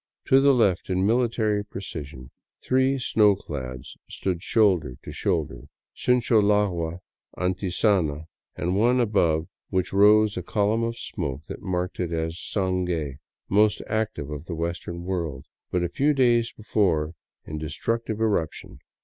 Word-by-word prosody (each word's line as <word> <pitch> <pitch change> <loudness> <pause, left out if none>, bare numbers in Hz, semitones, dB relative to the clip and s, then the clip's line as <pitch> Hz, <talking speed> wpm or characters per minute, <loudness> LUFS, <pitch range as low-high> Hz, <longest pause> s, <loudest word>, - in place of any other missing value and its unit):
To 135 +1 +6
the 140 0 +6
left, 100 -8 +2
in 95 +1 +1
military 110 -2 +1
precision, 75 -10 -8 0.3
three 130 +1 +2
snow 105 -5 +4
clads 65 -9 -7
stood 90 -3 -2
shoulder 90 - +2
to - - -8
shoulder - - -2 0.2
— - - -68
Sincholagua, 105 -8 +2 0.4
Antisana, 90 -4 0 0.3
and 90 +2 -1
one 120 +5 +3
above 85 -8 +2 0.2
which 95 -1 -1
rose 105 +1 +5
a - - -1
column 105 +5 0
of 115 0 -2
smoke 75 -10 -4
that - - -8
marked 90 -1 -3
it 90 -2 -2
as 80 0 -1
Sangai, 90 -7 -2 0.3
most 105 +1 +3
active 110 -10 -2
of 75 +1 -6
the 85 - -5
western 85 +1 -4
world, 85 -5 -3 0.2
but 90 -1 0
a - - +1
few 145 - +1
days 120 -3 +3
before 90 -8 0 0.3
in 75 0 -5
destructive 110 +8 -2
eruption. 100 - -1
95 Hz, 140 wpm, -25 LUFS, 80-110 Hz, 0.4 s, To